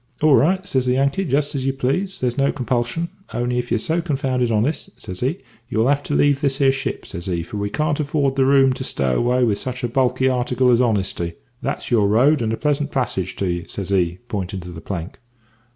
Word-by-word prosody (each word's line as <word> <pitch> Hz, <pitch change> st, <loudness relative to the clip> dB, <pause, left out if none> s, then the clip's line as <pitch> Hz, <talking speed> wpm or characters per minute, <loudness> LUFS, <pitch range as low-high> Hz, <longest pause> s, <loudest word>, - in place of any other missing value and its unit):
"`Ah 155 Hz, -2 st, +6 dB
right,' 185 Hz, +5 st, +2 dB
says 130 Hz, -8 st, +1 dB
the 125 Hz, -, +3 dB
Yankee; 140 Hz, +8 st, +1 dB
`just 145 Hz, -2 st, 0 dB
as 135 Hz, -2 st, -2 dB
you 135 Hz, -, +1 dB
please; 140 Hz, +9 st, -1 dB
there's 125 Hz, -2 st, 0 dB
no 140 Hz, +1 st, +2 dB
compulsion; 125 Hz, +5 st, -1 dB, 0.3 s
only 120 Hz, 0 st, 0 dB
if 120 Hz, -, -4 dB
you're -, -, +2 dB
so 160 Hz, +9 st, 0 dB
confounded 135 Hz, -6 st, 0 dB
honest,' 115 Hz, +8 st, 0 dB
says 90 Hz, -3 st, -6 dB
he, 135 Hz, +8 st, 0 dB, 0.3 s
`you'll 115 Hz, 0 st, +2 dB
have 145 Hz, 0 st, +2 dB
to 145 Hz, -, -3 dB
leave 145 Hz, -1 st, +3 dB
this 140 Hz, -2 st, +1 dB
here 135 Hz, -2 st, +4 dB
ship,' 135 Hz, 0 st, -4 dB
says 85 Hz, +2 st, -7 dB
he, 85 Hz, -2 st, -1 dB
`for 105 Hz, +5 st, -6 dB
we 100 Hz, 0 st, -1 dB
can't 150 Hz, +5 st, -1 dB
afford 140 Hz, -2 st, 0 dB
the 135 Hz, -, +3 dB
room 135 Hz, -1 st, +5 dB
to 130 Hz, -, -5 dB
stow 65 Hz, -, 0 dB
away 120 Hz, -, +2 dB
sich 125 Hz, +5 st, -5 dB
a -, -, +2 dB
bulky 130 Hz, +1 st, +1 dB
article 125 Hz, 0 st, +2 dB
as 120 Hz, +1 st, +4 dB
honesty. 95 Hz, -7 st, 0 dB, 0.3 s
That's -, -, -3 dB
your 110 Hz, -4 st, +4 dB
road, 130 Hz, +8 st, +4 dB
and 110 Hz, -1 st, 0 dB
a 115 Hz, -, -1 dB
pleasant 145 Hz, -1 st, 0 dB
passage 120 Hz, -9 st, -2 dB
to 100 Hz, -, -2 dB
ye,' 85 Hz, -1 st, -2 dB
says 100 Hz, -1 st, -5 dB
he, 90 Hz, -3 st, +1 dB
pointin' 95 Hz, -3 st, -4 dB
to 90 Hz, -, -9 dB
the 80 Hz, -2 st, -9 dB
plank. 90 Hz, -1 st, -6 dB
125 Hz, 225 wpm, -21 LUFS, 110-140 Hz, 0.3 s, `Ah